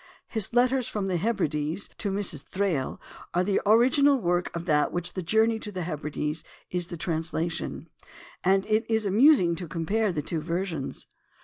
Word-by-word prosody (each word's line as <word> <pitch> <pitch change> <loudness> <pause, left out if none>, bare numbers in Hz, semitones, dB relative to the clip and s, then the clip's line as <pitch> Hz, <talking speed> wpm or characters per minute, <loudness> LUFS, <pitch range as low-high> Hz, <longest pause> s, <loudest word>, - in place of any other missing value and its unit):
His 220 -4 0
letters 250 +1 +2
from 210 -2 -2
the 185 -2 0
Hebrides 165 -4 -1
to 205 - -1
Mrs. 195 -7 0
Thrale 185 -9 -2 0.4
are 180 - +3
the 195 +1 +1
original 260 +6 +5 0.4
of 170 0 -4
that 150 -3 +3
work - - -2
of - - -12
which 175 0 -2
the 185 - -3
Journey 220 +5 +2
to 210 - -6
the 185 -3 -4
Hebrides 150 -1 -3 0.3
is 180 -1 -1
the 175 - -7
translation; 165 +1 -2 0.6
and 195 +1 +3
it 215 +1 +2
is 220 -1 +1
amusing 200 - +5
to 180 - -5
compare 190 +6 0
the 150 -4 -3
two 160 +1 -3
versions. 165 -3 -3
185 Hz, 175 wpm, -27 LUFS, 165-220 Hz, 0.6 s, original